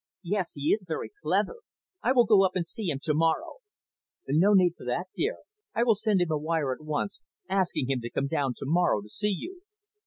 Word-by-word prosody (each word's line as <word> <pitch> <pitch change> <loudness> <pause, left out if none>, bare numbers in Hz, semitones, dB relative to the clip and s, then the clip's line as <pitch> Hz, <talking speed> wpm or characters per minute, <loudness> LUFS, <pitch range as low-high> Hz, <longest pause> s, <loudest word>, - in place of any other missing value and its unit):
"Yes, 185 0 -1
he 145 +1 -2
is 210 - -1
very 160 - -4
clever. 475 - 0 0.4
I 250 - +2
will 245 -2 +5
go 210 -3 +6
up 190 -1 +1
and 180 -2 0
see 205 +2 -4
him 140 - -1
to 155 - +1
morrow." 160 - +1 0.7
"No 165 +9 +4
need 180 -3 +5
for - - -13
that, 165 +10 -2
dear. 450 +6 -1 0.4
I 235 - +3
will 235 -2 +5
send 210 -2 +1
him 175 -2 0
a 155 - +1
wire 155 -3 0
at 130 - -11
once, 155 +6 -3 0.3
asking 185 -9 0
him 130 -2 0
to 120 - -5
come 135 - -1
down 140 -2 -1
to - - -7
morrow 160 - +2
to 105 - -14
see 210 - -2
you." 355 - -5
175 Hz, 220 wpm, -28 LUFS, 150-205 Hz, 0.7 s, go